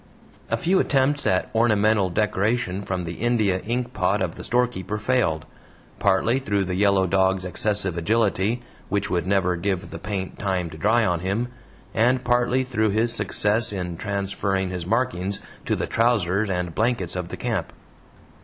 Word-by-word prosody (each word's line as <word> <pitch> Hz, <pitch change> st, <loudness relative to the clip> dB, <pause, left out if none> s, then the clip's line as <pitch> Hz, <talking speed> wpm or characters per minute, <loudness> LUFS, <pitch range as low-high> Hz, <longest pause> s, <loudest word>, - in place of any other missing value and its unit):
A -, -, +1 dB
few 185 Hz, +2 st, +2 dB
attempts 145 Hz, +1 st, +2 dB
at 95 Hz, 0 st, +1 dB
ornamental 110 Hz, -3 st, +3 dB
decoration 100 Hz, +1 st, 0 dB
from 95 Hz, -2 st, -3 dB
the 85 Hz, 0 st, -6 dB
India 110 Hz, -6 st, +2 dB
ink 120 Hz, +4 st, -3 dB
pot -, -, +1 dB
of -, -, -1 dB
the -, -, -9 dB
storekeeper 115 Hz, -5 st, 0 dB
failed, 105 Hz, -9 st, 0 dB, 0.5 s
partly 100 Hz, +6 st, +2 dB
through 100 Hz, -6 st, 0 dB
the 95 Hz, -1 st, -3 dB
yellow 100 Hz, 0 st, +3 dB
dog's 95 Hz, 0 st, +2 dB
excessive 95 Hz, -1 st, 0 dB
agility, 110 Hz, +4 st, +1 dB, 0.3 s
which 100 Hz, 0 st, -1 dB
would 90 Hz, 0 st, 0 dB
never 95 Hz, -2 st, +2 dB
give 95 Hz, +2 st, -2 dB
the -, -, -6 dB
paint 95 Hz, -1 st, -4 dB
time 95 Hz, -4 st, -1 dB
to 80 Hz, -, -9 dB
dry 110 Hz, +5 st, +3 dB
on 90 Hz, -2 st, +1 dB
him, 100 Hz, +7 st, -1 dB, 0.4 s
and 125 Hz, +3 st, +2 dB
partly 125 Hz, +1 st, +2 dB
through 110 Hz, -4 st, 0 dB
his 110 Hz, +3 st, +2 dB
success 110 Hz, -1 st, +1 dB
in 90 Hz, -3 st, -4 dB
transferring 100 Hz, 0 st, -2 dB
his 90 Hz, -2 st, -4 dB
markings 100 Hz, -4 st, 0 dB, 0.3 s
to -, -, +1 dB
the -, -, -2 dB
trousers 110 Hz, -3 st, +1 dB
and 90 Hz, -2 st, -2 dB
blankets 105 Hz, -4 st, 0 dB
of 90 Hz, -2 st, -3 dB
the -, -, -7 dB
camp. 110 Hz, -9 st, -2 dB
100 Hz, 165 wpm, -24 LUFS, 95-115 Hz, 0.5 s, ornamental